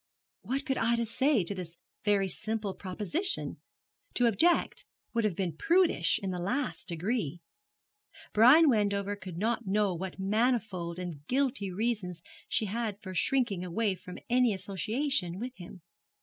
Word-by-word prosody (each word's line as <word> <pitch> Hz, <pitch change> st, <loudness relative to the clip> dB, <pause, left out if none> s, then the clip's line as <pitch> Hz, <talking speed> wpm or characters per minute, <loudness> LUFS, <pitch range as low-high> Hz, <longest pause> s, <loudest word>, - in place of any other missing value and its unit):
What 265 Hz, +8 st, -2 dB
could 270 Hz, -3 st, 0 dB
Ida 235 Hz, 0 st, +2 dB
say 260 Hz, 0 st, +2 dB
to 175 Hz, -, -1 dB
this 175 Hz, -3 st, -7 dB, 0.3 s
very 200 Hz, -2 st, +2 dB
simple 210 Hz, +2 st, -3 dB
proposition? 210 Hz, -, 0 dB, 0.6 s
To 245 Hz, -, +3 dB
object 320 Hz, -, +3 dB, 0.3 s
would 230 Hz, -1 st, +1 dB
have 200 Hz, -5 st, 0 dB
been 175 Hz, -5 st, -2 dB
prudish 335 Hz, -, +3 dB
in 190 Hz, -, -1 dB
the 180 Hz, -, -3 dB
last 195 Hz, -, -2 dB
degree. 175 Hz, -, -2 dB, 0.9 s
Brian 260 Hz, +10 st, +7 dB
Wendover 205 Hz, -4 st, +1 dB
could 185 Hz, -4 st, -8 dB
not 225 Hz, +2 st, -1 dB
know 205 Hz, 0 st, +2 dB
what 185 Hz, +2 st, -5 dB
manifold 200 Hz, -4 st, 0 dB
and 175 Hz, -6 st, -6 dB
guilty 255 Hz, -7 st, 0 dB
reasons 185 Hz, -4 st, -2 dB, 0.3 s
she 220 Hz, -, +1 dB
had 210 Hz, 0 st, -3 dB
for 185 Hz, -2 st, -6 dB
shrinking 220 Hz, 0 st, +1 dB, 0.4 s
from 180 Hz, +1 st, -10 dB
any 245 Hz, -3 st, +3 dB
association 195 Hz, -, -1 dB
with 245 Hz, +4 st, -5 dB
him. 180 Hz, 0 st, -11 dB
205 Hz, 140 wpm, -30 LUFS, 185-240 Hz, 0.9 s, Brian